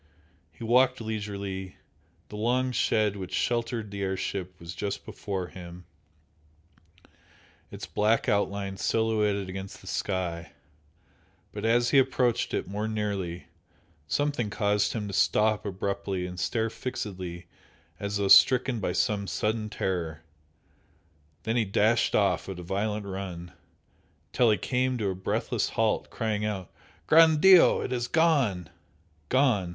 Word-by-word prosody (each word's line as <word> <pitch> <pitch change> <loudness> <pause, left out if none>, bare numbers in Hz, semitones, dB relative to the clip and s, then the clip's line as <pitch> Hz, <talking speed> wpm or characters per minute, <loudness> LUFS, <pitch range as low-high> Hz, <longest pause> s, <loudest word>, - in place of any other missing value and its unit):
He 115 - -12
walked 125 +2 +3
leisurely, 100 -4 -5 0.5
the - - -8
long 125 +4 +1
shed 110 -4 +1
which 95 -2 -5
sheltered 115 -3 -1
the 100 -1 -5
air 95 -1 -1
ship 90 -2 -4
was 85 +1 -8
just 100 +2 -4
before 95 -4 -5
him, 90 -1 -10 1.8
its - - -7
black 110 +2 +1
outline 100 -1 0
silhouetted 105 -3 0
against 95 +1 -7
the - - -17
sky 90 -4 -3 1.0
but - - -5
as 120 +1 +3
he 140 - +6
approached 125 -2 +1
it - - -2
more 105 +3 -3
nearly, 100 -5 -3 0.6
something 145 - 0
caused 105 0 +1
him 105 -3 -3
to 100 - -6
stop 105 +1 +2
abruptly 95 -1 -3
and 90 0 -7
stare 110 +6 -1
fixedly 95 -9 -5 0.5
as 100 0 -2
though 100 -1 0
stricken 125 +3 +6
by 90 -3 -2
some 100 +3 0
sudden 110 +3 -1
terror 85 -6 -3 1.2
then 110 +1 -1
he 120 - +3
dashed 110 +3 +2
off 95 -3 +1
at 95 - -5
a 90 - -7
violent 105 +3 -2
run, 95 -3 -6 0.8
till 120 -2 +4
he 105 - +3
came 130 0 0
to 105 -4 -1
a - - -1
breathless 95 +1 -1
halt, - - 0
crying 110 -2 -2
out 100 -4 -3 0.3
"Gran' 160 - +6
Dio! 185 +2 +7
It - - -4
has 120 -1 -1
gone!" 135 - +2 0.6
Gone! 125 -10 +2
105 Hz, 135 wpm, -27 LUFS, 95-115 Hz, 1.8 s, Dio